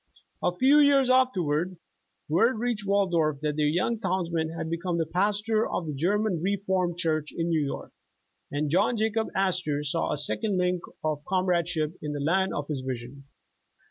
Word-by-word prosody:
A - - +2
few 275 +9 +5
years 280 -3 +5
afterward 185 - +1 0.5
word 220 +10 +3
reached 225 -3 -2
Waldorf, 175 -7 +2
that 150 -1 -1
their 150 -1 +2
yuung 185 +9 0
townsman 170 -4 -1
had 160 - -3
become 170 +1 -2
the 165 - +1
pastor 205 +6 0
of 175 - -2
the 155 - -4
German 185 +4 0
Reformed 190 -2 0
Church 155 -3 0
in 165 0 -2
New 160 -2 +2
York, 140 - -5 0.6
and 145 0 -2
John 205 +7 +2
Jacob 220 +1 0
Astor 180 -6 0
saw 145 - -1
a - - -1
second 195 +7 0
link 180 -1 +1 0.2
of 155 -2 -1
con'^radeship 175 -4 0
in 150 -1 -4
the 145 - -4
land 190 +6 +1
of 145 -1 -3
his 145 -4 -3
vision. 130 +1 -6
175 Hz, 170 wpm, -27 LUFS, 155-200 Hz, 0.6 s, few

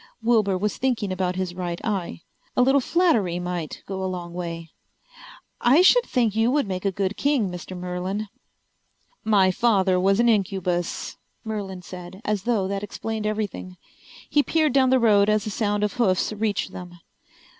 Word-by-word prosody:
Wilbur 215 -5 +3
was 210 +3 -2
thinking 240 -7 -1
about 185 -1 -1
his 185 -1 -3
right 175 -1 -4
eye. 190 -6 -3 0.3
A 250 - +6
little 270 +2 +4
flattery 245 - +2
might 175 -3 -5
go 190 -1 -4
a 190 - -1
long 175 -2 -6
way. 170 -2 -6 0.9
"I 275 +9 +5
should - - +6
think 230 -5 +1
you 225 +2 +3
would 280 -3 +1
make 185 0 -4
a 195 - +2
good 195 +1 -2
king, 270 -9 +1
Mr. 180 +1 -7
Merlin." 180 +4 -3 1.0
"My 200 -4 +4
father 190 -3 +2
was 195 +3 +2
an 240 - +4
incubus," 190 -5 -1 0.3
Merlin 200 -5 -5
said, 180 +1 -9
as 205 -2 -1
though 220 -6 +1
that 195 0 -3
explained 215 +1 -4
everything. 210 -4 -4 0.5
He 295 - +3
peered 310 -2 +1
down 265 -1 +4
the 260 - +5
road 210 -4 +4
as 215 -1 +2
the 215 - -4
sound 205 0 0
of 210 - 0
hoofs 205 -4 +1
reached 210 -1 -1
them. 175 -1 -9
200 Hz, 170 wpm, -24 LUFS, 185-225 Hz, 1.0 s, A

